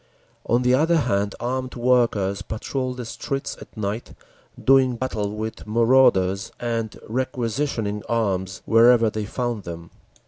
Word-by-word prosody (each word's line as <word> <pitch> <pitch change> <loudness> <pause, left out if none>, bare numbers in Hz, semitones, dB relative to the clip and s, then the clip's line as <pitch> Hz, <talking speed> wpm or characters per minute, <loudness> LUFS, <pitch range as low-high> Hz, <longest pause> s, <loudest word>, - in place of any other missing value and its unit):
On 120 +2 +2
the 125 0 +3
other 160 +5 +3
hand 100 -8 0
armed 130 +1 -3
workers 120 -6 +2
patrolled 125 +5 -4
the 125 - -5
streets 135 +4 -4
at - - -13
night, 105 +2 -4 0.5
doing 130 -2 +4
battle 115 -5 -2
with 110 0 -5
marauders 115 -4 +3
and 115 -2 -3
requisitioning 120 -3 -2
arms 100 -5 -1
wherever 115 0 +5
they 110 -1 -3
found 120 0 -3
them. 85 -2 -8
115 Hz, 130 wpm, -23 LUFS, 105-125 Hz, 0.5 s, wherever